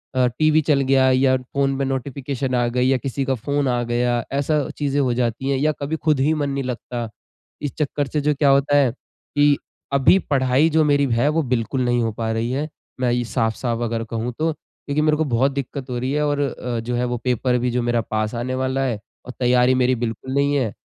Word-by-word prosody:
अ, 125 -1 +4
TV 155 0 +4
चल 145 -2 +2
गया 130 0 +3
या 130 0 +3
फ़ोन 135 +2 -1
में 135 - 0
नोटिफ़िकेशन 135 0 -3
आ 120 -1 +2
गई 125 +1 +1
या 135 - +3
किसी 135 +2 -3
का 135 -1 0
फ़ोन 140 +4 -1
आ 120 -1 +1
गया, 120 0 0
ऐसा 145 +1 0
चीजें 145 -1 0
हो 130 -3 +2
जाती 120 +2 -1
है 135 - +1
या 155 +2 +2
कभी 150 +3 -2
खुद 155 -3 +1
ही 150 +4 +3
मन 145 -2 -1
नहीं 140 0 -2
लगता। 120 -2 -4 0.5
इस 145 -3 -3
चक्कर 145 -1 -1
से 150 0 -1
जो 150 +1 +2
क्या 140 0 +3
होता 140 +1 +3
है 135 -4 +4
कि 145 +3 0 0.4
अभी 140 +7 +5
पढ़ाई 135 +3 +3
जो 160 0 +3
मेरी 145 -1 +3
है 120 +5 +2
वो 160 - +2
बिल्कुल 125 +3 -1
नहीं 120 0 +2
हो 115 - 0
पा 115 0 -2
रही 115 +2 -1
है। 145 +4 -1 0.3
मैं 125 - +2
ये 120 0 +1
साफ-साफ 115 +1 -1
अगर 115 0 -2
कहूँ 115 +1 -2
तो 160 +1 +1
क्योंकि 150 0 -5
मेरे 155 0 +2
को 160 - +1
बहुत 135 +4 +3
दिक्कत 140 0 -5
हो 125 - -2
रही 130 +2 -2
है 150 0 +1
और 145 -1 0
अ, 125 -4 -3
जो 120 +2 -3
है 125 +1 0
वो 120 0 -2
पेपर 125 0 +1
भी 125 0 0
जो 125 0 0
मेरा 120 -1 +1
पास 110 +1 -2
आने 130 +2 -2
वाला 130 +1 0
है 115 -5 -2 0.3
और 125 - -6
तैयारी 125 0 +4
मेरी 130 +1 +3
बिल्कुल 120 +2 -4
नहीं 140 +1 +2
है। 120 -7 0
130 Hz, 235 wpm, -21 LUFS, 120-140 Hz, 0.5 s, अभी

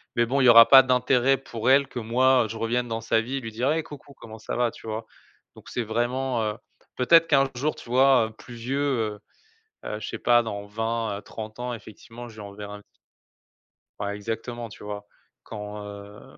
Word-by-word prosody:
mais 120 - +3
bon, 135 +4 0
il - - +4
y 125 - +7
aura 115 0 +9
pas 135 -1 +9
d'intérêt 130 +1 +2
pour 120 -3 -3
elle 135 0 +5
que 125 - -6
moi 125 +2 +3
je 110 - -6
revienne 120 +2 -1
dans 115 0 -3
sa 115 0 +1
vie, 135 +4 -4
lui 115 -2 -7
dire: 125 +6 0
«Hey 160 +1 0
coucou 145 -2 -12
comment 110 -4 -12
ça - - -5
va?» 120 -1 +1
tu 110 - -13
vois? 110 +1 -4 0.5
Donc - - -14
c'est 120 - -2
vraiment, 120 +2 -1
heu, 105 -1 -2 0.4
peut-être 165 +6 +5
qu'un 135 -2 +3
jour, 145 +5 -1
tu - - -13
vois, 130 -2 +4
heu, - - -11
plus 120 +2 -13
vieux, 125 +4 -3
heu 115 -7 -1 0.7
heu, 105 - -4
je - - -6
sais - - -5
pas 120 -1 +4
dans 100 -3 -6
20, 110 0 -2
heu, - - -11
30 110 0 -9
ans 125 0 -3
effectivement 115 +2 -11
je 110 - -14
lui - - -10
enverrai 105 0 -8
un 105 - -14 1.2
Ouais 100 0 -3
exactement, 115 +3 -5
tu 105 - -13
vois? 105 0 -7 0.4
Quand, 105 -1 -7
heu, 100 0 -11
115 Hz, 215 wpm, -25 LUFS, 110-130 Hz, 1.2 s, aura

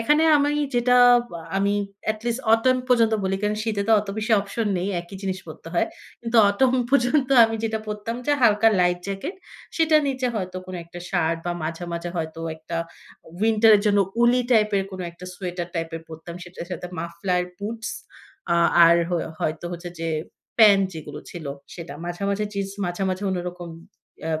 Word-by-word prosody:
এখানে 295 +7 +3
আমি 290 0 +2 0.2
যেটা 245 +1 +3 0.3
বা 170 - -7 0.2
আমি 200 +1 +2 0.4
at 215 - -11
least 240 +1 -1
autumn 255 +3 +4
পর্যন্ত 230 -3 +4
বলি 190 0 0
কারণ 210 0 0
শীতে 210 -3 -1
তো 225 - +5
অত 205 - -10
বেশি 220 +1 -1
অপশন 210 +3 -3
নেই। 185 - -2
একই 175 +3 -10
জিনিস 190 -1 -2
পড়তে 160 0 -10
হয়। - - +2 0.3
কিন্তু 235 0 -1
autumn 255 +5 +2
পর্যন্ত 270 +1 +3 0.2
আমি 225 0 -1
যেটা 220 0 -1
পরতাম 210 +2 -4
যে 295 - +3
হালকা 220 0 +5
লাইট 180 0 +2
জ্যাকেট 195 - -4 0.4
সেটার 315 -1 +4
নিচে 260 -1 -1
হয়তো 185 -3 -4
কোন 185 - -7
একটা 170 +1 -10
শার্ট 165 -3 +1
বা 175 - 0
মাঝে, 165 +2 -4
মাঝে 170 +1 -4
হয়তো 160 0 -4 0.2
একটা 165 +1 -6 0.6
উইন্টার 220 0 +4
এর - - -1
জন্য 205 -1 +4 0.2
woolly 240 +1 +4
type 215 -3 +4
এর - - +1
কোনো 185 - -5
একটা 170 +2 -13
সোয়েটার 175 -2 -5
টাইপের 165 -1 -3
পড়তাম। 160 +1 -9
সেটার 175 -1 -9
সাথে 180 0 -5
মাফলার 170 +2 -1 0.2
বুটস 220 +2 -5 0.7
আ - - +3 0.3
আর 170 0 +6
হ - - -3 0.3
হয়তো 155 +2 -2
হচ্ছে 175 0 -6
যে 165 - -2 0.5
প্যান্ট 200 -3 +7
যেগুলো 150 -2 -8
ছিল, 165 -4 -8 0.3
সেটা 170 -4 -8
মাঝামাঝি 200 +4 -2
জিন্স 195 -1 -2
মাঝামাঝি 185 +2 -2
অন্যরকম 180 -1 -4 0.5
ইয়াম 160 -1 -2
195 Hz, 175 wpm, -24 LUFS, 175-225 Hz, 0.7 s, প্যান্ট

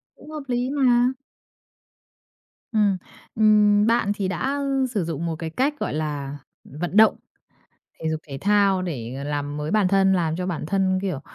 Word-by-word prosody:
Cũng - - -15
hợp 305 -2 -6
lý 245 0 -1
mà. 250 -3 +3 1.6
Ừm, 210 -4 +2 0.4
ừm, 210 -1 +5
bạn 230 -3 +2
thì 200 -2 -2
đã 265 +10 -2 0.3
sử 205 -6 -1
dụng 165 0 -4
một 165 -1 -2
cái 165 -2 -4
cách 275 - -1
gọi - - -2
là 145 -2 -3 0.3
vận 175 +7 -4
động 220 0 +7 0.9
thể 160 - -2
dục 160 -1 -2
thể 135 -1 -6
thao 200 -2 +3
để 135 -5 -5
làm 145 0 -3
mới 150 +1 -3
bản 210 -2 +3
thân, 195 0 +3
làm 165 -4 0
cho 180 +1 -3
bản 175 -5 -3
thân, 190 +1 +1
kiểu, 180 -9 -2
190 Hz, 170 wpm, -23 LUFS, 155-215 Hz, 1.6 s, động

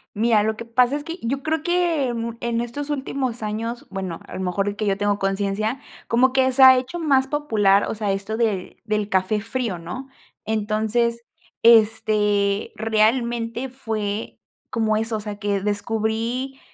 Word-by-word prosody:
Mira, 220 0 +3
lo 220 +1 -1
que 235 - -7
pasa 245 +3 +2
es 290 - -4
que 335 +3 -6
yo 270 +4 -2
creo 315 0 0
que 335 -7 +1
mu 230 0 -3
en 235 0 -1
estos 280 +5 -5
últimos 265 -4 -3
años, 225 +3 -4
bueno, 190 -3 -4
a - - -11
lo - - -5
mejor 195 +3 -1
que 210 0 -2
yo 195 0 +1
tengo 205 0 0
conciencia, 200 +5 -1 0.3
como 255 +3 +3
que 260 -1 +3
se 265 +1 +4
ha 260 0 +10
hecho 255 +7 -3
más 270 -4 +3
popular, 215 -9 +2
o - - -2
sea, 205 -2 -1
esto 200 +3 -3
de 215 -5 -1
del 210 -2 0
café 190 +3 +1
frío, 230 -4 -3
¿no?, 175 +11 -7 0.4
entonces, 220 +2 0 0.4
este, 210 -3 +3
realmente 230 +2 0
fue 220 -4 -4 0.3
como 220 -3 +1
eso, 225 0 -1
o - - -5
sea, 205 -1 -6
que 205 -2 -1
descubrí, 225 +5 -2
225 Hz, 170 wpm, -22 LUFS, 210-255 Hz, 0.4 s, ha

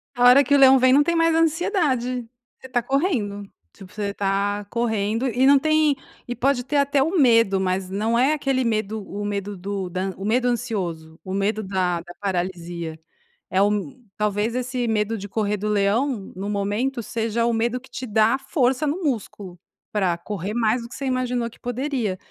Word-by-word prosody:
A 245 - 0
hora 250 +3 +8
que 285 - 0
o - - +6
leão 270 -1 +7
vem 255 0 +5
não 290 +2 +6
tem 340 +2 0
mais 330 0 +3
ansiedade, 310 - 0 0.3
você 260 - -11
tá 245 -1 0
correndo, 235 - -1 0.2
tipo, 190 -2 -14
você 205 -1 -3
tá 200 +1 -1
correndo, 225 +1 -1
e 255 +1 +2
não 280 +1 +7
tem, 310 0 +3 0.3
e 245 - -4
pode 255 0 +1
ter 290 +3 -1
até 280 0 +2
o 325 +7 +1
medo, 230 -7 +4
mas 185 0 -1
não 215 +4 0
é 265 +5 +3
aquele 270 -3 0
medo, 220 -2 -1
o 205 +1 -5
medo 205 0 -3
do 195 0 -4
da 185 +2 -2
o 195 - -6
medo 245 +4 +2
ansioso, 185 -10 -3
o 185 - -6
medo 205 +2 0
da 185 -3 -1
da 175 +1 -12
paralisia. 175 -4 -3 0.5
É, 185 - -1 0.6
talvez 210 +2 0
esse 250 -1 -2
medo 220 0 0
de 200 0 -7
correr 210 0 -1
do 210 +2 -3
leão 210 +2 0
no 195 +2 -4
momento 210 +6 -1
seja 230 +1 -1
o 235 - +1
medo 235 +2 0
que 265 +1 -18
te 250 +1 -6
dá 220 +1 +3
a - - -6
força 270 0 0
no 315 +6 -2
músculo 205 - -4 0.3
pra 190 -5 +1
correr 200 +2 -5
mais 230 +1 +1
do 235 - -9
que - - -11
você 275 - -5
imaginou 250 -2 -1
que 230 - -20
poderia. 245 -5 -2
225 Hz, 195 wpm, -23 LUFS, 200-260 Hz, 0.6 s, hora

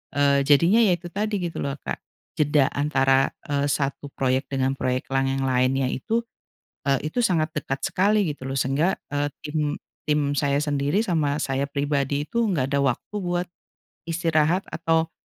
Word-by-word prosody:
eee, 140 -1 +4
jadinya 170 +9 +5
ya 195 -6 +4
itu 175 +1 -9
tadi 210 +2 -1
gitu 170 -2 -4
loh 140 -1 -2
Kak. - - -5 0.4
Jeda 145 -2 +3
antara, 135 -2 +2 0.2
eee, 145 0 0
1 140 +1 -1
proyek 130 0 0
dengan 135 -1 0
proyek 130 -1 -1
lang 135 0 +2
yang 135 0 -1
lainnya 130 +1 +2
itu, 225 - -1 0.7
eee, 140 +2 +1
itu - - -3
sangat 170 -8 +2
dekat 135 -2 -3
sekali 205 +3 +2
gitu 135 -2 -8
loh. 135 - -3
Sehingga, 135 +8 +1 0.2
eee, 145 0 0 0.2
tim 150 -1 -1 0.3
tim 150 -1 +2
saya 140 -1 +1
sendiri 145 +7 +1
sama 155 -7 +1
saya 135 +1 -1
pribadi 140 0 -1
itu 235 +9 -2
nggak 140 -9 0
ada 140 - +2
waktu 135 - -1
buat 175 -1 -1 0.6
istirahat 165 +2 +1
atau 165 0 +1
145 Hz, 165 wpm, -24 LUFS, 135-165 Hz, 0.7 s, jadinya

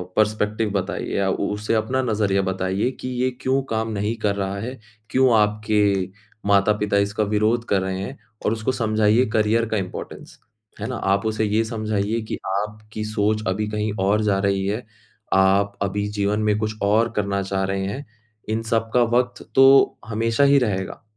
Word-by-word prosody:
Perspective 105 0 +1
बताइए 95 0 -2
या 100 -1 +1
उ 100 - -1
उसे 105 +2 -2
अपना 115 +4 0
नज़रिया 105 -4 +1
बताइए 95 +3 -1
कि - - -4
ये 130 - +2
क्यों 135 +1 +1
काम 110 0 -1
नहीं 105 +2 -1
कर 100 -1 +2
रहा 100 0 -2
है, 125 +5 -6 0.3
क्यों 130 -2 +4
आपके 105 -2 +1 0.4
माता-पिता 100 +1 +3
इसका 100 +2 +1
विरोध 110 +3 +1
कर 100 -2 +2
रहे 95 0 -3
हैं 130 +8 -6 0.3
और - - +2
उसको 110 +3 -1
समझाइए 110 0 +2
करियर 110 +2 +2
का 110 - 0
इम्पोर्टेंस, 95 -2 -7 0.4
है - - -2
ना? - - -4
आप 100 +2 0
उसे 110 0 0
ये 105 +2 +2
समझाइए 110 -1 -1
कि - - -2 0.2
आपकी 105 0 -7
सोच 110 0 0
अभी 105 +3 -1
कहीं 105 0 -1
और 105 +2 +3
जा 100 -2 +2
रही 100 -1 +1
है, 105 +4 -2 0.5
आप 100 +1 +3
अभी 100 +1 -1
जीवन 105 0 0
में 105 -1 +2
कुछ 110 0 -2
और 110 +3 +3
करना 100 -1 0
चाह 95 0 -1
रहे 95 0 -2
हैं। 130 +9 -5 0.4
इन 110 +1 0
सब 115 -1 0
का 125 - +5
वक़्त 125 0 -1
तो 135 +1 +6
हमेशा 115 +3 +1
ही 140 0 +5
रहेगा, 95 -6 -2
105 Hz, 180 wpm, -22 LUFS, 100-110 Hz, 0.5 s, तो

